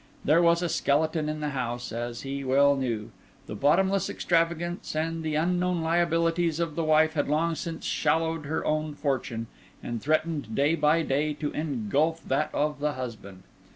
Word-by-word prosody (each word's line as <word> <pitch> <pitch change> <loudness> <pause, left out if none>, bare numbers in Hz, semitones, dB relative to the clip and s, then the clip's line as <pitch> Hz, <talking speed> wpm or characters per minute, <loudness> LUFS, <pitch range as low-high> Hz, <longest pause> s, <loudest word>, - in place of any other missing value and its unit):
There 155 +4 +5
was 170 0 +4
a - - +1
skeleton 155 0 +1
in 155 0 -4
the 150 - -1
house, 120 -2 -3
as 120 +1 -4
he 140 0 -4
well 140 +2 +4
knew. 120 -6 -3 0.3
The - - -7
bottomless 190 - +2
extravagance 170 0 -1
and 165 +1 -1
the 155 -1 -2
unknown 180 +2 +1
liabilities 165 0 +1
of 165 -2 -1
the 165 - -1
wife 155 0 +4
had 145 -2 0
long 165 +3 +1
since 165 0 -5
swallowed 160 0 0
her 160 +2 -2
own 155 -1 -1
fortune, 130 -6 -2 0.4
and 120 -2 -4
threatened 155 -5 -1
day 145 +3 +3
by 160 +1 +3
day 150 +1 0
to 150 0 -3
engulph 150 +3 -1
that 140 +3 +1
of 150 0 -1
the 150 0 0
husband. 110 -7 -7
155 Hz, 170 wpm, -27 LUFS, 140-165 Hz, 0.4 s, There